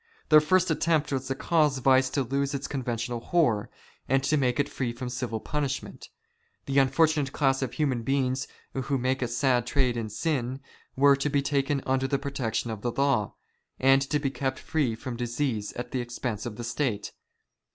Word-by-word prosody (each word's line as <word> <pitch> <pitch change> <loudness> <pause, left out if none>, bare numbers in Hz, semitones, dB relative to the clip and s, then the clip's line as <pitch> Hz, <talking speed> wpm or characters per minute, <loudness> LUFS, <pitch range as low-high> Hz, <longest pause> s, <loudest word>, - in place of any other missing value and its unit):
Their 155 -1 +8
first 185 +3 +3
attempt 160 -2 +1
was 135 -1 -2
to 135 - -1
cause 150 -2 +2
vice 130 0 +4
to 140 - 0
lose 140 +3 -1
its 140 - -4
conventional 120 -3 -3
horror, 120 -7 +1 0.4
and 135 +1 +3
to 145 +3 +2
make 130 -2 +1
it 145 - +2
free 125 -4 -3
from 125 +1 -6
civil 125 -2 -3
punishment. 140 +2 -4 0.6
The 140 0 +2
unfortunate 145 +1 +3
class 135 -2 +1
of 130 -3 -2
human 135 -6 0
beings 130 +1 0 0.3
who 135 +1 -1
make 130 +1 0
a 125 - +1
sad 120 0 +1
trade 130 -4 +1
in 110 -2 -3
sin, 130 +1 -2 0.4
were 140 +1 +6
to 145 +2 -1
be 140 -1 +1
taken 140 -1 0
under 130 0 +1
the 140 - +1
protec 135 -5 -3
tion 115 +1 -1
of 110 -2 -6
the 120 - -1
law, 135 -6 +1 0.4
and 135 +1 +5
to 150 - +2
be 140 -2 -1
kept 135 -1 -2
free 145 -8 -1
from 120 +1 -6
disease 120 -3 -2
at 125 0 -6
the 130 - -1
expense 120 -2 -4
of 110 - -6
the 120 - -6
State. 120 -3 -2
135 Hz, 195 wpm, -27 LUFS, 120-140 Hz, 0.6 s, Their